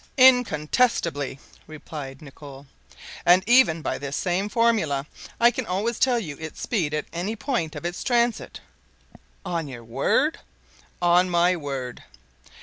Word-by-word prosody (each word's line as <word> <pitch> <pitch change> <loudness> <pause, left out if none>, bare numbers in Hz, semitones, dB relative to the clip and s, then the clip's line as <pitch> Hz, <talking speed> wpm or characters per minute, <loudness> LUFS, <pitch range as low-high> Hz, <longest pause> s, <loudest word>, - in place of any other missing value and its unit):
"Incontestably," 225 - +3 0.3
replied 150 -3 -9
Nicholl; 140 -1 -12 0.6
"and 180 +2 +5
even 230 -10 +4
by - - -2
this 140 0 -4
same 185 +3 -1
formula 210 - +1 0.3
I 235 +1 +6
can 250 -2 -4
always 210 +6 -2
tell 255 -2 +3
you 155 -11 -5
its 160 -1 -8
speed 165 -10 -1
at 150 - -2
any 185 +6 -3
point 205 - -2
of 150 - -7
its 175 0 -4
transit." 240 -2 0 0.8
"On 165 -3 -2
your 120 -4 -9
word?" 115 0 0 0.6
"On 175 +1 +4
my 175 +1 +3
word." 135 -6 -6
175 Hz, 135 wpm, -24 LUFS, 145-230 Hz, 0.8 s, I